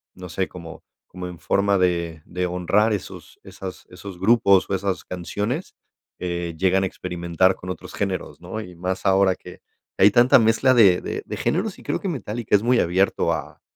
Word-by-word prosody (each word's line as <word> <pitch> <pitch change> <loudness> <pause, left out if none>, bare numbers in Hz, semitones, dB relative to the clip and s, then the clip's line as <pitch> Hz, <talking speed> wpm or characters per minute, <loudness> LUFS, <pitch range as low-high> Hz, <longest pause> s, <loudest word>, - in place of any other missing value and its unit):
no 90 -1 -9
sé, 95 +3 -2
como 85 -2 -11 0.2
como 90 0 -8
en 90 -1 -9
forma 100 +3 +1
de 85 -3 0
de 90 +1 -2
honrar 90 +5 +1
esos 105 -3 -6
esas 95 -1 -9
esos 90 +1 -9
grupos 100 -2 +4
o - - -3
esas 95 0 -2
canciones, 105 - -4 0.4
eh, 85 -2 -4
llegan 95 +2 +2
a - - +1
experimentar 90 0 0
con 90 - -10
otros 90 - -7
géneros, 95 -3 -4
¿no?, 90 +5 -6
y 90 -5 -9
más 90 +2 -4
ahora 95 -1 +4
que 90 -1 -13 0.4
hay - - +8
tanta 120 +5 +6
mezcla 115 +3 +3
de 100 -7 +5
de - - -4
de - - -6
géneros 190 +4 -1
y - - -15
creo - - -2
que 195 - -3
Metallica 115 - -1
es 100 - +2
muy 120 0 +3
abierto 95 +3 +1
a - - -5
95 Hz, 190 wpm, -23 LUFS, 90-105 Hz, 0.4 s, hay